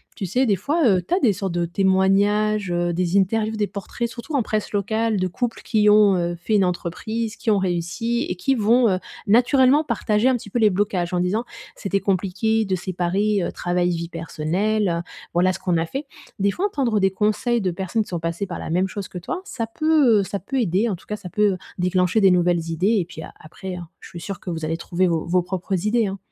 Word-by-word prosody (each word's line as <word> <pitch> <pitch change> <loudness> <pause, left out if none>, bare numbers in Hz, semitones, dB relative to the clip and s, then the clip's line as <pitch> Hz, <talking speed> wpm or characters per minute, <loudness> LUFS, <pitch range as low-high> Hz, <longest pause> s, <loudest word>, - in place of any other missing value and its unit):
Tu 195 - -4
sais? 245 +8 +1
Des 205 - +3
fois, 290 - -1
heu, 190 -3 +4
tu - - -1
as 365 - +3
des 245 - +4
sortes 195 -2 -3
de 175 0 0
témoignages, 195 +2 +2
heu, 175 0 0
des 180 +2 +1
interviews, 215 +3 0
des 210 -1 0
portraits, 200 +4 -4
surtout 245 +6 -9
en 270 - +3
presse 215 -1 -2
locale 220 +2 0
de 185 - +1
couples 235 +6 -3
qui 210 -2 +3
ont, 205 -2 +6
heu, 175 0 -1
fait 175 +6 -1
une 195 -2 +4
entreprise, 210 +6 -3
qui 220 - 0
ont 205 - +3
réussi 185 +6 -1
et 180 - -3
qui 270 +10 0
vont, 230 +1 +4
heu, 185 - +1 0.3
naturellement 260 +6 +4
partager 215 -5 +1
un 260 - +4
petit 215 -3 -6
peu 240 - -2
les 215 -3 +4
blocages 185 -3 -1
en 180 - +1
disant: 185 +6 0 0.3
«C'était 200 -1 -1
compliqué 200 +4 0
de 190 - -2
séparer, 185 +3 0
heu, - - -2
travail, 175 0 0
vie 170 0 -3
personnelle, 170 +3 -1 0.3
voilà 185 +1 +3
ce 190 - -7
qu'on 180 -2 0
a 165 - 0
fait». 275 - -5 0.3
Des 200 +1 +2
fois 365 - -1
entendre 260 - 0
des 195 -1 +2
conseils 215 +4 0
de 185 - 0
personnes 190 +5 -2
qui 210 - -5
sont 175 - -3
passées 165 +4 -3
par 175 - -5
la - - -6
même 185 +3 +2
chose 200 0 -6
que 180 - -6
toi, 360 - -4
ça 230 -3 -4
peut, 275 -5 +3
heu, - - -1
ça 200 +1 -4
peut 260 +8 -3
aider. 210 +2 +1
En 195 - -1
tout 175 - -17
cas, 210 - -4
ça 205 -3 -9
peut, 210 +3 +2
heu, - - -5 0.2
déclencher 180 +3 +1
des 195 - +6
nouvelles 175 -2 +2
idées 195 +7 +2
et 175 - -1
puis 160 -2 -10
a - - -10
après 180 +4 -8
hein, 175 -2 -8
je - - -13
suis 170 - -9
sûre 195 0 -6
que 180 - -8
vous 160 -2 -3
allez 165 +1 -2
trouver 180 +2 0
vos 165 -2 -1
vos 180 +1 +2
propres 185 +1 -3
idées, 225 0 +2
hein? 195 0 -4
195 Hz, 240 wpm, -22 LUFS, 180-220 Hz, 0.3 s, ont